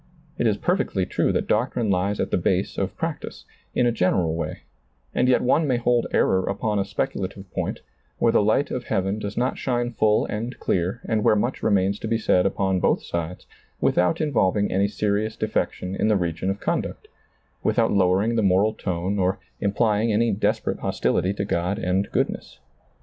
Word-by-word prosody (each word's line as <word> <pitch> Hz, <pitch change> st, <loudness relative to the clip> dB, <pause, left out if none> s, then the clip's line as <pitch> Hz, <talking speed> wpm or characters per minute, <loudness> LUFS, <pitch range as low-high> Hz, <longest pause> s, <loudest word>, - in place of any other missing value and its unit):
It 120 Hz, -, +3 dB
is 105 Hz, -2 st, +1 dB
perfectly 175 Hz, -, 0 dB
true -, -, 0 dB
that -, -, -1 dB
doctrine 115 Hz, -1 st, +1 dB
ties 100 Hz, +2 st, 0 dB
at -, -, -1 dB
the -, -, +2 dB
base -, -, 0 dB
of -, -, -3 dB
practice, -, -, -5 dB, 0.3 s
in 125 Hz, -, +3 dB
a 120 Hz, -, +3 dB
general 90 Hz, -6 st, +1 dB
way, 80 Hz, -2 st, -4 dB, 0.5 s
and 125 Hz, -, +2 dB
yet 125 Hz, -, +3 dB
one 145 Hz, +5 st, +3 dB
may 125 Hz, -3 st, +2 dB
hold 120 Hz, 0 st, +1 dB
error 95 Hz, 0 st, +2 dB
upon 105 Hz, +1 st, -1 dB
a 100 Hz, -, 0 dB
speculative 95 Hz, -1 st, -4 dB
point, -, -, -3 dB, 0.4 s
where 115 Hz, -, +3 dB
the -, -, +4 dB
light 110 Hz, +7 st, +2 dB
of 125 Hz, -1 st, -3 dB
heaven 95 Hz, +3 st, -1 dB
does 105 Hz, -1 st, -5 dB
not 125 Hz, +2 st, 0 dB
shine 120 Hz, -2 st, -1 dB
full 110 Hz, -1 st, +2 dB
and 115 Hz, +4 st, -4 dB
clear 95 Hz, +6 st, -1 dB
and 110 Hz, -2 st, 0 dB
where 105 Hz, -, +4 dB
much 120 Hz, +5 st, -1 dB
remains 100 Hz, 0 st, +2 dB
to -, -, -4 dB
be 115 Hz, +1 st, +1 dB
said 90 Hz, -4 st, +3 dB
upon 95 Hz, -1 st, 0 dB
both -, -, +1 dB
sides, 85 Hz, +1 st, -4 dB, 0.3 s
without 90 Hz, -1 st, +2 dB
in 150 Hz, -2 st, -1 dB
volving 100 Hz, -1 st, +2 dB
any 100 Hz, +2 st, +2 dB
serious 105 Hz, +1 st, -1 dB
defection 95 Hz, -4 st, -2 dB
in -, -, +1 dB
the 105 Hz, -2 st, +3 dB
region 85 Hz, +1 st, -2 dB
of 100 Hz, +1 st, -2 dB
conduct, -, -, -3 dB, 0.5 s
without -, -, +2 dB
lowering 100 Hz, +4 st, +2 dB
the 115 Hz, -, +2 dB
moral 100 Hz, +2 st, +3 dB
tone, 95 Hz, 0 st, -2 dB
or 95 Hz, +1 st, +1 dB, 0.2 s
implying 105 Hz, +2 st, +1 dB
any 115 Hz, +2 st, +2 dB
desperate 100 Hz, -, 0 dB
hostility 95 Hz, -, 0 dB
to 100 Hz, 0 st, -3 dB
God 90 Hz, 0 st, -1 dB
and 95 Hz, +2 st, 0 dB
good -, -, +2 dB
ness. -, -, -10 dB
100 Hz, 190 wpm, -24 LUFS, 95-115 Hz, 0.5 s, the